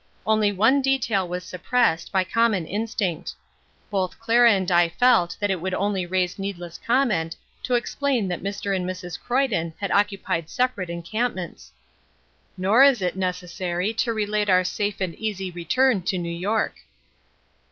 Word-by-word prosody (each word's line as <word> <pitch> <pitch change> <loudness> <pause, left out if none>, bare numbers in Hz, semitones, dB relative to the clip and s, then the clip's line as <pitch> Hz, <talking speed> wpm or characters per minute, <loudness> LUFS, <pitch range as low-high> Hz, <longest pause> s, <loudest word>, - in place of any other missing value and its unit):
Only 215 -1 +3
one 225 +8 +3
detail 235 -8 +1
was 180 +1 -4
suppressed, 180 -1 0
by 190 -1 +2
common 210 -2 +1
instinct. 205 -3 -3 0.6
Both 190 -3 -1
Clara 235 +1 +5
and 190 -3 0
I 175 -1 +4
felt 180 -3 +3
that 205 -1 0
it 185 -3 -2
would 185 +1 -2
only 195 -3 -1
raise 185 +1 -1
needless 175 -4 -6
comment 230 -11 +1 0.3
to 250 - 0
explain 245 -2 0
that 175 -1 -3
Mr. 200 0 -2
and 185 - -1
Mrs. 180 -1 -5
Croyden 235 -11 0
had 200 - -3
occupied 195 -5 0
separate 250 -8 -1
encampments. 175 - -4 0.9
Nor 200 +7 +4
is 270 -7 +6
it 180 - -1
necessary 180 +1 -2
to 230 +1 0
relate 210 -1 -1
our 185 -1 +5
safe 200 +2 -2
and 185 -3 -1
easy 195 -4 -3
return 195 +7 +1
to 185 +2 -1
New 170 -1 -3
York. 205 +6 -1
195 Hz, 150 wpm, -24 LUFS, 180-225 Hz, 0.9 s, is